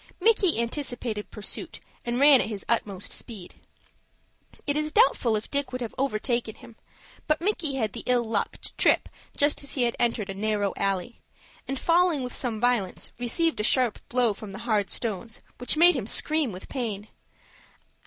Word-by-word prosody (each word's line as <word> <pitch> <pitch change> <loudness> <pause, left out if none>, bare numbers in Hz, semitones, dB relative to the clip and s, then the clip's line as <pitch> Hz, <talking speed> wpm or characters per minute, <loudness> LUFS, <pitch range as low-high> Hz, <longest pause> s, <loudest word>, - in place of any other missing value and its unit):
Micky 395 - +3
anticipated 235 -3 -2
pursuit, 210 - -5 0.2
and 240 0 -2
ran 280 -2 +7
at - - -1
his 210 -3 -6
utmost 205 -5 -1
speed. 210 -7 -6 1.1
It 285 - 0
is 305 0 -1
doubtful 240 -6 +4
if 210 - -4
Dick 280 -1 0
would 255 0 -4
have 235 - -4
overtaken 235 -3 -1
him, 240 -3 -14 0.5
but 305 0 +2
Micky 335 -7 0
had 220 -6 -1
the - - -5
ill 250 -1 +3
luck 220 -3 -1
to - - -6
trip - - +3 0.3
just 290 +1 +2
as 280 - -7
he 255 - +1
had 235 -1 +1
entered 230 -4 0
a - - -5
narrow 205 0 -1
alley, 195 +3 -2 0.5
and, 270 -1 -3
falling 335 -4 +3
with 250 - -5
some 230 -4 -2
violence, 240 -5 0
received 315 +6 0
a - - 0
sharp 250 0 +3
blow 245 -3 +2
from 200 0 -9
the 200 - -7
hard 210 -4 +1
stones, 225 -1 -2 0.2
which 250 +5 +1
made 345 +1 +7
him 230 -7 -3
scream 305 0 +2
with 185 0 -9
pain. 220 -6 -4
240 Hz, 175 wpm, -26 LUFS, 215-280 Hz, 1.1 s, ran